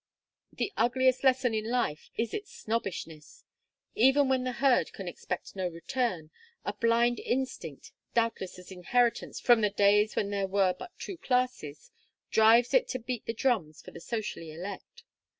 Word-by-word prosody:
The 405 Hz, -, -3 dB
ugliest 260 Hz, +1 st, +2 dB
lesson 260 Hz, -3 st, +3 dB
of 215 Hz, -1 st, -1 dB
life 230 Hz, -10 st, -1 dB
is 230 Hz, -1 st, -1 dB
its 410 Hz, -1 st, -5 dB
snobbishness. 180 Hz, -8 st, -5 dB, 0.5 s
Even 270 Hz, +4 st, +4 dB
when 260 Hz, -1 st, +2 dB
the 255 Hz, 0 st, -2 dB
herd 265 Hz, 0 st, +2 dB
can 195 Hz, -3 st, -7 dB
expect 180 Hz, +2 st, -6 dB
no 190 Hz, -2 st, -1 dB
return, 175 Hz, -, -3 dB, 0.3 s
a -, -, -2 dB
blind 235 Hz, +1 st, +2 dB
instinct 245 Hz, -, -4 dB, 0.2 s
doubtless 230 Hz, -6 st, 0 dB
an 180 Hz, 0 st, -11 dB
inheritance 240 Hz, +6 st, +1 dB
from 240 Hz, -3 st, +5 dB
the 210 Hz, -, +3 dB
days 205 Hz, +1 st, +3 dB
when 200 Hz, -1 st, -1 dB
there 200 Hz, -1 st, -1 dB
were 190 Hz, -1 st, +2 dB
but 360 Hz, -, -11 dB
two 385 Hz, -, -7 dB
classes 250 Hz, -, -2 dB, 0.4 s
drives 225 Hz, +2 st, +5 dB
it -, -, +4 dB
to 255 Hz, -, -3 dB
beat 245 Hz, -1 st, -5 dB
the 230 Hz, -, -1 dB
drums 215 Hz, -, -1 dB
for -, -, -11 dB
the 170 Hz, -, -11 dB
socially 210 Hz, -8 st, -4 dB
elect. 185 Hz, +5 st, -8 dB
230 Hz, 160 wpm, -29 LUFS, 190-250 Hz, 0.5 s, from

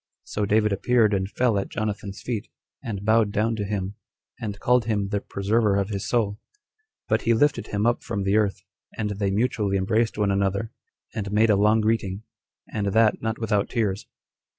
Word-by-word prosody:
So 105 Hz, -1 st, -2 dB
David 105 Hz, 0 st, +3 dB
appeared 110 Hz, +1 st, +3 dB
and 95 Hz, -1 st, 0 dB
fell 115 Hz, -2 st, +1 dB
at 95 Hz, -, -4 dB
Jonathan's 105 Hz, -2 st, -4 dB
feet, 115 Hz, -3 st, -3 dB, 0.4 s
and 105 Hz, -5 st, -5 dB
bowed 110 Hz, -1 st, +3 dB
down 110 Hz, +3 st, +1 dB
to 105 Hz, -, -1 dB
him, 100 Hz, -1 st, -3 dB, 0.4 s
and 105 Hz, -3 st, -5 dB
called 125 Hz, -2 st, +3 dB
him 105 Hz, -3 st, -1 dB
the 100 Hz, -1 st, -1 dB
preserver 105 Hz, +1 st, +1 dB
of 100 Hz, 0 st, 0 dB
his 100 Hz, -2 st, -3 dB
soul; 105 Hz, -4 st, 0 dB, 0.7 s
but -, -, +2 dB
he 115 Hz, 0 st, +2 dB
lifted 145 Hz, +6 st, +2 dB
him 105 Hz, +1 st, -1 dB
up 120 Hz, 0 st, +2 dB
from 100 Hz, -5 st, -3 dB
the 95 Hz, +1 st, +1 dB
earth, 105 Hz, -2 st, +1 dB, 0.3 s
and 105 Hz, -2 st, -1 dB
they 100 Hz, 0 st, -1 dB
mutually 105 Hz, -1 st, +1 dB
embraced 110 Hz, +4 st, +1 dB
one 105 Hz, -2 st, +2 dB
another, 100 Hz, +2 st, 0 dB, 0.4 s
and 100 Hz, -2 st, -4 dB
made 110 Hz, +1 st, +4 dB
a -, -, +5 dB
long 105 Hz, +2 st, +4 dB
greeting, 105 Hz, -2 st, -1 dB, 0.5 s
and 105 Hz, -1 st, -1 dB
that 110 Hz, -1 st, +3 dB
not 110 Hz, 0 st, -2 dB
without 105 Hz, -3 st, 0 dB
tears. 105 Hz, -5 st, -1 dB
105 Hz, 185 wpm, -25 LUFS, 100-110 Hz, 0.7 s, a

